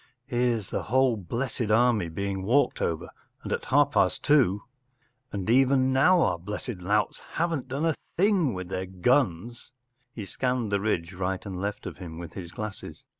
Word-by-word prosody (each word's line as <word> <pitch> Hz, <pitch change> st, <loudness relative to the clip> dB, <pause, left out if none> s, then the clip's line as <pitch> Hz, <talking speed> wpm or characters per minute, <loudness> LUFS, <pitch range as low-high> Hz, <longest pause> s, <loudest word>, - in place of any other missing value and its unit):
Here’s 120 Hz, -5 st, 0 dB
the -, -, -1 dB
whole 130 Hz, +1 st, +2 dB
blessed 115 Hz, +4 st, -3 dB
army 110 Hz, -5 st, +3 dB
being 95 Hz, +3 st, -3 dB
walked 120 Hz, +9 st, +2 dB
over, 80 Hz, -2 st, -2 dB, 0.3 s
and -, -, -3 dB
at -, -, -3 dB
half 145 Hz, +1 st, +3 dB
past -, -, +2 dB
two 125 Hz, -10 st, +3 dB, 0.3 s
“ 125 Hz, +2 st, -43 dB
And 100 Hz, -3 st, -4 dB
even 130 Hz, +2 st, +4 dB
now 175 Hz, +7 st, +5 dB
our 85 Hz, -, +1 dB
blessed 105 Hz, +4 st, -5 dB
louts 105 Hz, +3 st, 0 dB, 0.2 s
haven’t 165 Hz, -5 st, -1 dB
done 140 Hz, +5 st, -2 dB
a 165 Hz, -, +2 dB, 0.2 s
thing 180 Hz, -, +3 dB
with 90 Hz, -1 st, -6 dB
their 95 Hz, 0 st, -3 dB
guns! 120 Hz, -, 0 dB, 0.2 s
” 125 Hz, 0 st, -46 dB
He 105 Hz, -, -5 dB
scanned 125 Hz, +2 st, -1 dB
the 100 Hz, -, +2 dB
ridge 95 Hz, -4 st, -1 dB
right 95 Hz, +1 st, -3 dB
and 95 Hz, -2 st, -5 dB
left 100 Hz, +1 st, -4 dB
of -, -, -6 dB
him 85 Hz, -3 st, -8 dB
with 85 Hz, -1 st, -8 dB
his 85 Hz, -3 st, -7 dB
glasses. 105 Hz, 0 st, -7 dB
115 Hz, 180 wpm, -27 LUFS, 95-130 Hz, 0.3 s, now